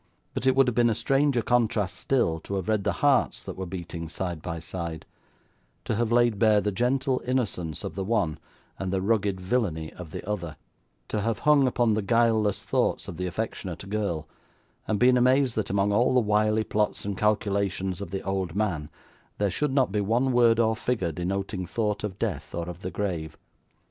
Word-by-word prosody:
But, 130 Hz, -, -2 dB
it 130 Hz, -, +4 dB
would 135 Hz, -1 st, +5 dB
have 125 Hz, -, +1 dB
been 120 Hz, +1 st, +4 dB
a 110 Hz, -, +1 dB
stranger 135 Hz, -1 st, +2 dB
contrast 115 Hz, -4 st, +1 dB
still, 120 Hz, -12 st, +1 dB
to 100 Hz, +5 st, -5 dB
have 95 Hz, -3 st, -3 dB
read 105 Hz, -3 st, +1 dB
the -, -, +2 dB
hearts 140 Hz, -3 st, +3 dB
that -, -, -6 dB
were 95 Hz, -1 st, -5 dB
beating 85 Hz, -2 st, -6 dB
side 85 Hz, -2 st, -4 dB
by 85 Hz, 0 st, -4 dB
side; 85 Hz, -1 st, -5 dB, 0.8 s
to -, -, -1 dB
have 115 Hz, +1 st, 0 dB
laid 120 Hz, -3 st, +3 dB
bare 110 Hz, -1 st, +5 dB
the 105 Hz, +1 st, -1 dB
gentle 130 Hz, +5 st, +1 dB
innocence 100 Hz, -, -2 dB
of -, -, -4 dB
the 95 Hz, -, -3 dB
one, 100 Hz, -7 st, 0 dB, 0.4 s
and 95 Hz, -1 st, -2 dB
the 95 Hz, -, +1 dB
rugged 100 Hz, -1 st, +1 dB
villainy 90 Hz, -6 st, -1 dB
of 90 Hz, -3 st, -9 dB
the 85 Hz, -, -7 dB
other; 85 Hz, -7 st, -3 dB, 0.5 s
to 105 Hz, -, -1 dB
have 115 Hz, 0 st, 0 dB
hung 145 Hz, -3 st, +5 dB
upon 120 Hz, -2 st, +2 dB
the 110 Hz, -, +1 dB
guileless 110 Hz, -1 st, +2 dB
thoughts -, -, 0 dB
of 85 Hz, -, -7 dB
the 90 Hz, 0 st, -2 dB
affectionate 95 Hz, -2 st, -4 dB
girl, 100 Hz, -8 st, -2 dB, 0.6 s
and 110 Hz, -, +1 dB
been 125 Hz, +2 st, +5 dB
amazed 130 Hz, +1 st, +3 dB
that, 110 Hz, -, -2 dB
among 100 Hz, +1 st, +1 dB
all 120 Hz, +4 st, +3 dB
the -, -, +6 dB
wily 105 Hz, 0 st, +2 dB
plots 105 Hz, -2 st, -1 dB
and 100 Hz, -1 st, -2 dB
calculations 100 Hz, -2 st, 0 dB
of 100 Hz, -, -5 dB
the 95 Hz, +1 st, -4 dB
old 95 Hz, -3 st, -2 dB
man, 90 Hz, -8 st, -1 dB, 0.5 s
there 100 Hz, -2 st, +1 dB
should 150 Hz, -, 0 dB
not 130 Hz, -5 st, +2 dB
be 105 Hz, +1 st, 0 dB
one 120 Hz, +6 st, +1 dB
word 120 Hz, -2 st, +5 dB
or 110 Hz, -1 st, +3 dB
figure 110 Hz, -7 st, -1 dB
denoting 95 Hz, +1 st, -3 dB
thought 105 Hz, 0 st, -1 dB
of 100 Hz, -3 st, -4 dB
death 85 Hz, -10 st, -3 dB
or 85 Hz, 0 st, -3 dB
of 90 Hz, 0 st, -7 dB
the 90 Hz, -, -3 dB
grave. 85 Hz, -7 st, -3 dB
105 Hz, 200 wpm, -26 LUFS, 90-115 Hz, 0.8 s, the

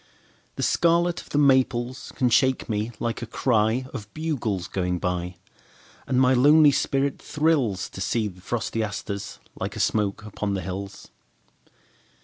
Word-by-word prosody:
The -, -, -3 dB
scarlet 170 Hz, 0 st, +2 dB
of -, -, -17 dB
the -, -, -1 dB
maples 130 Hz, -2 st, +2 dB
can 125 Hz, -3 st, +2 dB
shake 130 Hz, +2 st, +2 dB
me 110 Hz, 0 st, -2 dB
like 115 Hz, 0 st, -2 dB
a 120 Hz, -, -5 dB
cryOf 115 Hz, 0 st, 0 dB
bugles 120 Hz, -, -2 dB
going 90 Hz, -1 st, -1 dB
by. 90 Hz, 0 st, -3 dB, 0.7 s
And 130 Hz, -, +1 dB
my 130 Hz, 0 st, +5 dB
lonely 145 Hz, +4 st, +6 dB
spirit 140 Hz, 0 st, 0 dB
thrillsTo 140 Hz, -, 0 dB
see 110 Hz, +3 st, 0 dB
the 90 Hz, -2 st, -11 dB
frosty 115 Hz, +2 st, -2 dB
asters 100 Hz, -1 st, -5 dB, 0.2 s
like 100 Hz, +3 st, -4 dB
a -, -, -6 dB
smoke 105 Hz, 0 st, 0 dB
upon 105 Hz, -1 st, -3 dB
the 95 Hz, -, -2 dB
hills. 95 Hz, +3 st, -7 dB
115 Hz, 140 wpm, -25 LUFS, 100-130 Hz, 0.7 s, lonely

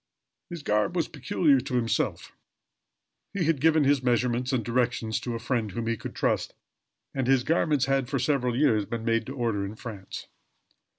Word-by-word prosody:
His 170 Hz, -4 st, -7 dB
garb 105 Hz, +11 st, +1 dB
was 170 Hz, -, +1 dB
peculiar 150 Hz, -1 st, +2 dB
to 130 Hz, 0 st, -4 dB
himself. 115 Hz, -2 st, -1 dB, 1.0 s
He 195 Hz, -, 0 dB
had 155 Hz, -4 st, +1 dB
given 160 Hz, -1 st, +4 dB
his 140 Hz, -1 st, +3 dB
measurements 125 Hz, 0 st, +1 dB
and 120 Hz, -5 st, 0 dB
directions 120 Hz, -2 st, 0 dB
to 120 Hz, -2 st, -4 dB
a -, -, -3 dB
friend 115 Hz, -2 st, -1 dB
whom 115 Hz, +4 st, -4 dB
he 115 Hz, 0 st, 0 dB
could -, -, -8 dB
trust, -, -, 0 dB, 0.6 s
and 130 Hz, -2 st, -1 dB
his 130 Hz, -2 st, +4 dB
garments 150 Hz, -2 st, +2 dB
had, 135 Hz, -2 st, 0 dB
for 135 Hz, -, 0 dB
several 125 Hz, -2 st, +1 dB
years, 115 Hz, -8 st, +3 dB
been 115 Hz, -1 st, -4 dB
made 115 Hz, -1 st, +1 dB
to 135 Hz, -, -6 dB
order 115 Hz, -6 st, -1 dB
in 100 Hz, +2 st, -5 dB
France. 105 Hz, -4 st, -8 dB
125 Hz, 180 wpm, -27 LUFS, 115-140 Hz, 1.0 s, given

